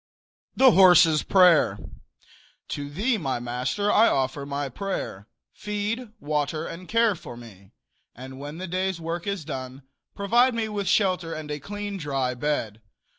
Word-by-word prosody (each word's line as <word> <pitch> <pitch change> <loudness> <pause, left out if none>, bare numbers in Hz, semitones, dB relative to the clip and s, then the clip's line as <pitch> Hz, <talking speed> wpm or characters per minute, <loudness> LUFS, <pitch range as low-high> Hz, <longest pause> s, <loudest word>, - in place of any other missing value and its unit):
THE 260 -1 +6
HORSE'S 175 -5 +6
PRAYER. 175 - +4 0.9
To 145 0 -5
thee, 215 - 0
my 135 -6 -2
master, 125 +12 -1
I 225 +2 +5
offer 135 +1 -1
my 140 0 -3
prayer: 130 - -5 0.3
Feed, 210 +3 -4
water 150 +1 -2
and 180 +2 -8
care 230 -1 +3
for 140 -8 -10
me; 100 -5 -14 0.4
and 130 +2 -10
when 145 +3 -7
the 185 - -5
day's 185 0 -2
work 165 +3 -5
is 200 -6 -3
done, 130 -2 -7 0.3
provide 235 +5 +3
me 225 -1 -1
with 205 -2 -3
shelter 185 -5 +1
and 155 -1 -7
a 150 - -4
clean, 205 +4 -6
dry 135 -6 -2
bed. 120 -5 -3
165 Hz, 150 wpm, -25 LUFS, 135-200 Hz, 0.9 s, THE